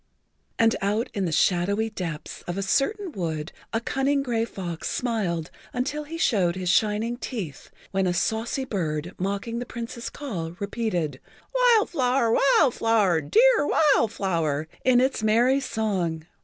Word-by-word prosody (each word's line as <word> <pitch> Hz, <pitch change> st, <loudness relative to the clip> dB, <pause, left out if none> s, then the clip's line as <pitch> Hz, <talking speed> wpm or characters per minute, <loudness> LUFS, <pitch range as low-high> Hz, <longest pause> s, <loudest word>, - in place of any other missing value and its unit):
And 225 Hz, 0 st, +4 dB
out 210 Hz, +5 st, 0 dB
in 195 Hz, -2 st, -1 dB
the 170 Hz, -, -1 dB
shadowy 195 Hz, +7 st, +2 dB
depths 165 Hz, -7 st, -6 dB
of 175 Hz, +1 st, -3 dB
a -, -, 0 dB
certain[Pg 365 Hz, -, 0 dB
43] 190 Hz, -, -6 dB
wood 160 Hz, 0 st, -3 dB, 0.2 s
a 225 Hz, -, 0 dB
cunning 275 Hz, +4 st, 0 dB
gray 230 Hz, -3 st, 0 dB
fox 175 Hz, -7 st, -5 dB
smiled 195 Hz, -10 st, -2 dB, 0.2 s
until 290 Hz, +4 st, -2 dB
he 325 Hz, +3 st, -6 dB
showed 185 Hz, -, +2 dB
his 185 Hz, -1 st, -2 dB
shining 215 Hz, +5 st, +1 dB
teeth 200 Hz, -, -6 dB, 0.2 s
when 195 Hz, -1 st, +1 dB
a -, -, +2 dB
saucy 225 Hz, +7 st, -1 dB
bird, 170 Hz, -, -3 dB
mocking 200 Hz, +5 st, -2 dB
the 245 Hz, -, -4 dB
Prince's 235 Hz, 0 st, -6 dB
call, 175 Hz, -, -5 dB
repeated, 185 Hz, -, -2 dB, 0.3 s
"Wild -, -, +4 dB
Flower! 255 Hz, -5 st, +2 dB
Wild 275 Hz, +1 st, +4 dB
Flower! 210 Hz, -7 st, +2 dB
Dear 455 Hz, -, +4 dB
Wild 275 Hz, -8 st, +3 dB
Flower!" 160 Hz, -6 st, -1 dB, 0.2 s
in 255 Hz, -1 st, +5 dB
its 260 Hz, -2 st, +1 dB
merry 235 Hz, +5 st, +3 dB
song. 190 Hz, -, -2 dB
220 Hz, 155 wpm, -25 LUFS, 175-255 Hz, 0.3 s, in